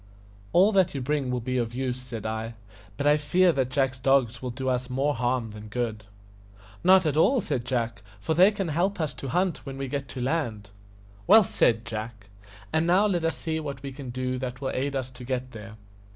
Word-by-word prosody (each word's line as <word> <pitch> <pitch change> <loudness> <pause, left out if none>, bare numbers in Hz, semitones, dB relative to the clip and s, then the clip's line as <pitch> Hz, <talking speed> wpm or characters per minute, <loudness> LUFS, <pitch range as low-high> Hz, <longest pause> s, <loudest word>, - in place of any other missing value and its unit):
"All 195 +4 +5
that 190 -7 +2
you 135 - -2
bring 140 0 -1
will 125 -1 -1
be 130 +2 -2
of 120 -1 -2
use," 130 -1 -2
said 120 -4 -7
I; 110 +1 -3 0.4
"but 140 - -2
I 145 +1 +5
fear 175 +5 +3
that 130 -5 0
Jack's 130 -1 0
dogs 130 -3 +2
will 130 - -3
do 130 +2 -5
us 125 0 0
more 135 +3 +1
harm 120 -2 -1
than 105 0 -10
good." 110 -1 -3 0.8
"Not 185 0 +6
at 150 -1 0
all," 255 - +4
said 140 - -2
Jack, 115 -4 -2 0.2
"for 130 +10 -1
they 180 +5 +7
can 195 -4 -3
help 180 +5 0
us 155 -4 -1
to 130 +2 -7
hunt 180 +6 0
when 135 -1 -7
we 135 0 -3
get 140 +1 -3
to 130 - -7
land." 120 -7 -2 0.6
"Well 215 +4 +8
said, 115 -10 +1
Jack. 110 -1 -6 0.4
And 160 +1 +2
now 185 +4 +4
let 180 -5 0
us 165 - 0
see 160 -1 -2
what 140 -3 -6
we 140 - -5
can 130 -1 -8
do 130 +1 -2
that 125 -1 -5
will 135 -1 -2
aid 140 +2 -2
us 130 -1 -3
to 125 0 -11
get 130 0 -3
there." 110 -1 -10
130 Hz, 220 wpm, -26 LUFS, 120-155 Hz, 0.8 s, Well